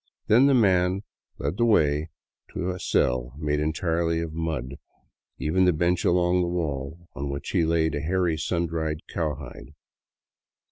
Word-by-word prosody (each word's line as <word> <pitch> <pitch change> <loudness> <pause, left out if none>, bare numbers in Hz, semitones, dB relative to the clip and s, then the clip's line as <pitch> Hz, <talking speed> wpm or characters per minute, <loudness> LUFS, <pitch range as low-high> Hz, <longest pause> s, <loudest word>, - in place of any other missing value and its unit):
Then 125 +6 +5
the 140 - +4
man 95 -3 +3 0.3
led 70 +7 -3
the 120 - +3
way 75 -7 +2 0.5
into 90 - -1
a 90 - -6
cell 60 -3 0
made 75 -1 -1
entirely 80 +2 0
of 85 -1 -4
mud, 80 -5 -3 0.6
even 90 +5 +1
to - - +6
the 80 - -4
bench 85 +2 +1
along 90 +1 +3
the 90 - 0
wall, 80 -1 -3
on 70 0 -4
which 70 +1 -5
he 90 - +2
laid 80 -1 +1
a 75 - -2
hairy, 85 0 +1
sun 85 +2 -1
dried 80 -1 -3
cowhide. 70 -6 -5
80 Hz, 160 wpm, -25 LUFS, 75-90 Hz, 0.6 s, to